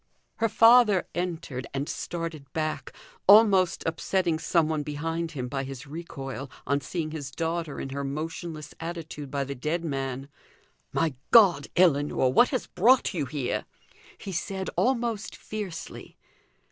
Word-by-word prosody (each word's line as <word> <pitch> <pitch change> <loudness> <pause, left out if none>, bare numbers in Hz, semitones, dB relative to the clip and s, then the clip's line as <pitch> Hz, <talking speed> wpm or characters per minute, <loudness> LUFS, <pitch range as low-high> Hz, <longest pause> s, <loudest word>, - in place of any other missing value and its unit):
Her 225 -1 +1
father 225 -4 +6
entered, 165 -8 -4
and 140 +2 -2
started 165 -5 -5
back, 155 -4 -2 0.4
almost 200 -3 +6
upsetting 165 0 0
some 165 -1 +2
one 155 -1 -1
behind 165 +3 -3
him 125 -4 -4
by 135 +1 -3
his 135 0 -7
recoil, 135 -3 -7 0.2
on 140 +1 +1
seeing 155 +2 -3
his 145 -4 -5
daughter 165 0 -3
in 135 - -4
her 140 +1 -4
motionless 155 +2 -5
attitude 165 -3 -6
by 140 0 -1
the 140 +1 -5
dead 155 +6 -2
man. 135 -2 -3 0.6
"My 165 -3 +1 0.2
God, 185 -11 +6
Ellinor! 145 -6 +3
what 245 - +6
has 255 - -2
brought 255 -2 +3
you 150 -7 -2
here?" 135 -2 -2 0.5
he 195 - -7
said, 190 +2 -3
almost 235 -4 0
fiercely. 210 -6 -7
160 Hz, 140 wpm, -27 LUFS, 140-180 Hz, 0.6 s, father